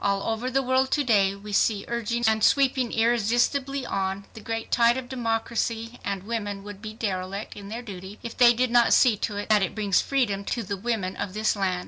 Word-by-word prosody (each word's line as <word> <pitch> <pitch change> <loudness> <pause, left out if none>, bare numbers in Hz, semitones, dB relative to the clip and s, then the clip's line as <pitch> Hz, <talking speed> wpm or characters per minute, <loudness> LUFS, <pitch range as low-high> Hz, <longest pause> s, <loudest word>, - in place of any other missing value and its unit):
All 200 -1 +1
over 225 +3 -2
the 270 +1 +1
world 260 +1 +2
to 290 - +2
day 200 -6 +3
we 205 +1 -9
see 205 0 +2
surging 235 0 -2
and 220 -1 +2
sweeping 260 -3 +3
irresistibly 240 +4 +1
on, 195 -1 -2
the 220 - -10
great 225 +1 -4
tide 235 +1 +4
of 260 -1 -5
democracy, 230 -1 -2
and 200 -2 -3
women 205 -2 -4
would 205 -1 -9
be 215 -1 -7
derelict 195 -2 -4
in 200 -1 -9
their 230 +3 -5
duty 195 -1 -9
if 235 - -6
they 240 -1 +7
did 250 0 +1
not 240 -1 +5
see 245 -4 +5
to 205 0 -3
it 205 - -4
that 210 -1 +5
it 190 - -2
brings 205 -4 +2
freedom 230 -8 0
to 235 +2 -2
the 200 0 -3
women 200 -3 -2
of 195 -1 -4
this 215 0 +1
land 190 -3 0
225 Hz, 215 wpm, -25 LUFS, 200-240 Hz, -, they